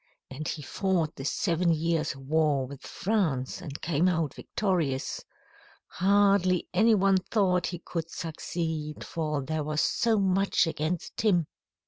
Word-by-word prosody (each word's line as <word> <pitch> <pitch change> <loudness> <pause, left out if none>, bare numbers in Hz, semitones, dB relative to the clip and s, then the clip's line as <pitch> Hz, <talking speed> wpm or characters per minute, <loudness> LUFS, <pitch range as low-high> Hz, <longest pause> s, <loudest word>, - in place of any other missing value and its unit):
And 150 +4 -5
he 150 - -4
fought 175 -1 -1
the 135 - -7
Seven 170 +4 +1
Years' 165 -2 0
War 140 0 +1
with 135 +1 -10
France 180 - -1
and 150 -5 -7
came 165 +1 +2
out 165 -5 0
victorious. 170 -10 -1 0.7
Hardly 195 -1 +3
any 220 +4 +5
one 195 -1 +4
thought 185 -3 +1
he 175 - -4
could 165 -1 -4
succeed, 160 -2 -4
for 155 -4 -2
there 155 +2 -2
was 150 +1 0
so 230 -2 +2
much 195 -1 +2
against 160 +1 -3
him. 185 -7 +3
165 Hz, 135 wpm, -28 LUFS, 150-190 Hz, 0.7 s, any